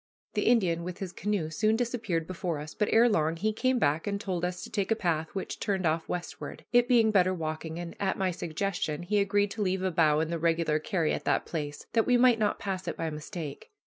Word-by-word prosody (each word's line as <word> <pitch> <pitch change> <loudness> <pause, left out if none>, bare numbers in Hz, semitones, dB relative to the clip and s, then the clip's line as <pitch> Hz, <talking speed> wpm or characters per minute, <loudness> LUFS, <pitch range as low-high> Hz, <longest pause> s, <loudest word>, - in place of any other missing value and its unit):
The - - 0
Indian 180 -8 +3
with 180 0 -5
his 190 -3 -5
canoe 190 -6 -2
soon 215 +6 +2
disappeared 225 -8 -1
before 175 -2 -3
us, 150 +1 -7
but 210 -2 0
ere 230 +2 +6
long 160 -7 +2
he 215 +6 0
came 255 +3 +1
back 155 -3 +1
and 200 0 -1
told 185 -5 -3
us 180 0 -2
to - - -9
take 200 -3 -1
a 225 - +3
path 165 -6 0
which 190 - -4
turned 190 -3 -1
off 160 0 0
westward, 175 -1 -5
it 245 0 +5
being 230 -3 +5
better 185 -2 +3
walking, 160 0 -4
and, 170 -1 -6
at 195 -1 0
my 190 -1 +1
suggestion, 170 -1 -2
he 205 +4 +1
agreed 205 0 +2
to 220 - -4
leave 190 -1 0
a 190 - +1
bough 155 -2 +3
in 160 +1 -1
the 170 - -1
regular 165 -2 +1
carry 160 0 0
at - - -4
that - - +1
place 145 -3 -5
that 225 - +3
we 250 -1 +5
might 245 -2 +5
not 210 -1 +1
pass 190 -2 -4
it - - -3
by 165 -1 -2
mistake. 150 - -7
180 Hz, 235 wpm, -29 LUFS, 160-210 Hz, -, ere